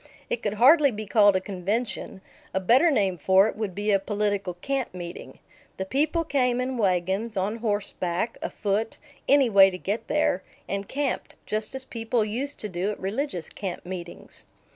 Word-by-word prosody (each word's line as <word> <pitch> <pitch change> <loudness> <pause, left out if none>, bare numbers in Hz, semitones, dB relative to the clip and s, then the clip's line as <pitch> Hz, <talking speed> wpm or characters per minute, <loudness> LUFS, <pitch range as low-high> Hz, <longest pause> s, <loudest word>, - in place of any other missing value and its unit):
It 235 - -1
could 210 -1 -1
hardly 280 +6 +6
be 215 -3 -5
called 205 -1 +5
a - - +3
convention; 195 +2 -3 0.3
a - - +3
better 245 - +5
name 195 - +1
for 190 +6 +5
it - - -4
would 210 -4 -4
be 205 +1 0
a 195 - +4
political 205 -2 -1
camp 265 +3 -3
meeting. 175 -1 -8 0.4
The 190 - -2
people 305 - +1
came 250 -5 +1
in 255 -1 -2
wagons, 195 +3 0
on 200 +4 0
horseback, 205 -3 -2
afoot 210 +2 -2 0.3
any 280 -2 +6
way 195 -3 +7
to 180 - -6
get 205 +5 -3
there 300 -11 +1 0.3
and 200 0 -3
camped, 280 -2 -2
just 215 +4 -3
as 265 0 -5
people 230 -2 -1
used 260 +7 -3
to 210 - -3
do 185 +1 -2
at 210 - -4
religious 195 - -3
camp 190 -3 -5
meetings. 175 -1 -6
210 Hz, 175 wpm, -26 LUFS, 190-245 Hz, 0.4 s, way